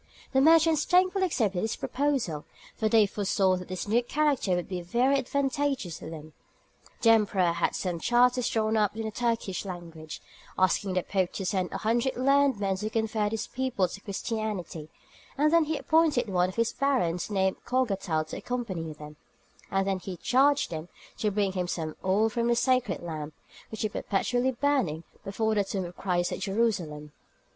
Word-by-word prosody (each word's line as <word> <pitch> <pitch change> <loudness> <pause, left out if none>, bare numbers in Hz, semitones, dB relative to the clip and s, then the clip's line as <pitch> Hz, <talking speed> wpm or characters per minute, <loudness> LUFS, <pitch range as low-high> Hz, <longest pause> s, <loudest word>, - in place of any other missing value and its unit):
The 265 - +4
merchants 320 0 +5
thankfully 370 +1 +3
accepted 210 - 0
his 220 - -1
proposal, 260 - -1 0.3
for 220 - 0
they 220 -1 +5
foresaw 195 -2 +1
that 180 - -8
this 185 +2 -5
new 230 +4 +3
character 275 -7 +1
would 175 - -3
be 180 -2 -4
very 240 +10 +2
advantageous 275 - -1
to - - -8
them. 155 -1 -9 0.7
The 230 - +7
emperor 200 -5 +3
had 170 - 0
some 180 -3 -2
charters 245 +4 +3
drawn 220 0 0
up 210 0 +1
in 225 - -2
the 220 - -3
Turkish 230 -4 -1
language, 170 -4 -8 0.4
asking 185 +1 +2
the 185 - +1
Pope 190 -3 -1
to 195 - -4
send 185 -1 -1
a - - -3
hundred 235 +4 0
learned 275 -2 +3
men 195 -2 0
to 210 +3 -3
convert 220 -1 0
his 225 - -2
people 255 -7 -1
to 195 - -9
Christianity; 200 -7 -4 0.5
then 305 +3 +4
he 310 0 -1
appointed 310 -7 +2
one 180 -1 +2
of 185 - -9
his 230 0 +1
barons 220 -12 0
named 190 -2 0
Cogatal 195 -11 0
to - - -5
accompany 185 -11 -4
them, 150 0 -11 0.5
and 195 -1 0
he 185 -1 -6
charged 275 - +3
them 160 +1 -5 0.3
to 215 - +1
bring 200 -1 0
him 180 -1 -2
some 160 -3 -3
oil 195 +4 +3
from 235 +1 -1
the 240 - +3
sacred 245 -6 +1
lamp, 155 -3 -6 0.3
which 220 0 -3
is 215 - -2
perpetually 245 +8 0
burning 245 - 0 0.2
before 220 +3 -1
the 205 -1 +2
tomb 195 -1 -3
of 175 +1 -9
Christ 175 -2 -1
at - - -4
Jerusalem. 185 -9 -1
210 Hz, 175 wpm, -28 LUFS, 180-250 Hz, 0.7 s, The